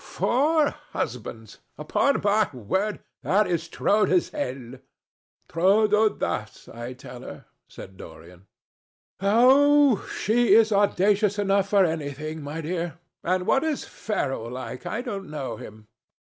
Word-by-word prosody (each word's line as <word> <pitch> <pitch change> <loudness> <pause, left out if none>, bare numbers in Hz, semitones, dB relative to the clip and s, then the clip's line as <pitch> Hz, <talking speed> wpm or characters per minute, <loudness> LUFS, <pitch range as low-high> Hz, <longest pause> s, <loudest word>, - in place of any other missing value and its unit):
"Four 295 +4 +1 0.2
husbands! 115 -3 -5 0.2
Upon 265 - +1
my 210 -1 +2
word 190 - -2 0.2
that 210 +3 +2
is 170 -2 -2
trop 210 +4 +2
de 185 - +2
zêle." 130 -8 -3 0.7
"Trop 200 +6 +3
d'audace, 210 0 -1
I 120 +2 -7
tell 125 -1 -11
her," - - -10 0.2
said 95 0 -12
Dorian. 85 +3 -13 0.7
"Oh! 260 +5 +5
she 235 +3 +3
is 225 -1 +5
audacious 205 0 +2
enough 200 -1 +1
for 200 -2 +4
anything, 155 -1 -4
my 150 +3 -5
dear. 170 +1 -4 0.3
And 185 +1 0
what 270 - +2
is 315 -3 -2
Ferrol 135 - -3
like? 125 0 -7
I 235 +3 -3
don't 200 -6 -6
know 150 -3 -5
him." 110 -3 -12
185 Hz, 130 wpm, -25 LUFS, 135-215 Hz, 0.7 s, Oh